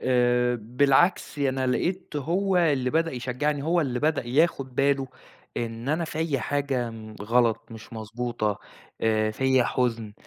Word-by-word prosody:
آآ 125 -1 +2
بالعكس، 135 - +2
أنا 130 -2 0
لقيت 175 +5 -1
هو 185 +6 0
اللي 145 -7 +2
بدأ 165 +2 +1
يشجّعني، 130 +4 -2
هو 170 +3 +2
اللي 125 -5 -1
بدأ 150 -5 +1
ياخُد 135 -1 +1
باله 135 -1 +2 0.5
إن 115 +2 -4
أنا 160 +3 +1
فيّا 155 -4 -2
حاجة 135 -2 -1
م 110 -1 -10
غلط 115 +1 +2
مش 110 0 -11
مضبوطة، 110 -1 -3 0.4
آآ 110 -1 +2
فيّا 130 +2 +2
حُزن. 115 -3 -1
130 Hz, 140 wpm, -26 LUFS, 115-145 Hz, 0.5 s, آآ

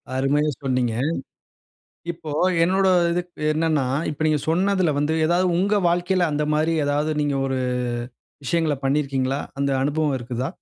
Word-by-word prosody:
அருமையா 145 +3 +1
சொன்னீங்க. 125 -3 0 1.2
இப்போ 160 -2 -9 0.3
என்னுடைய 190 +2 +3 0.2
இது 180 - 0 0.3
என்னன்னா, 155 -3 +1 0.3
இப்ப 155 +1 -3
நீங்க 150 -2 +2
சொன்னதுல 185 -1 +2
வந்து 150 +2 +1
ஏதாவது 175 +2 +2
உங்க 200 +4 +2
வாழ்க்கையில 175 0 +1
அந்த 150 +1 0
மாதிரி 155 +2 +1
ஏதாவது 145 +2 0
நீங்க 145 -1 0
ஒரு 135 -1 -1 0.9
விஷயங்கள 165 +1 +1
பண்ணியிருக்கீங்களா? 135 -1 0 0.2
அந்த 140 0 0
அனுபவம் 145 0 0
இருக்குதா? 125 +1 -4
150 Hz, 130 wpm, -23 LUFS, 140-170 Hz, 1.2 s, என்னுடைய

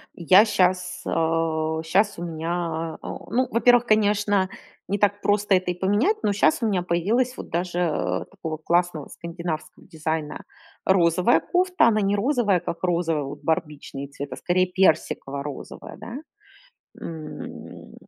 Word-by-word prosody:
Я 185 +5 +6
щас, 185 -2 +1
а, 160 -1 0
щас 195 +3 +1
у - - -4
меня, 165 0 -3
а, - - -7
о, - - -11
ну, 255 +1 +2
во-первых, 245 +1 +4
конечно, 205 -3 +2 0.4
не 200 - +1
так 205 0 +1
просто 205 -1 +2
это 180 -1 0
и - - -2
поменять, 210 - +2
но 205 - +2
щас 155 -3 +2
у 230 - +1
меня 195 -4 +1
появилась 225 +10 0
вот - - -8
даже, 175 +1 -2
э, 90 - -1
такого 165 -5 -6
классного 170 -2 0
скандинавского 170 -1 -6
дизайна 155 -1 -4 0.4
розовая 180 +3 +4
кофта. 360 -7 +2
Она 215 -2 +3
не 200 0 +1
розовая, 215 -5 +2
как 170 - -5
розовый, 170 -4 +1
вот 135 - -7
барбичный 150 -4 -3
цвет, 140 0 -8
а - - -5
скорее 185 +1 +1
персиково-розовая, 145 -5 -1
да, 220 +4 -8 0.9
м. 160 -2 -8
180 Hz, 145 wpm, -24 LUFS, 160-205 Hz, 0.9 s, Я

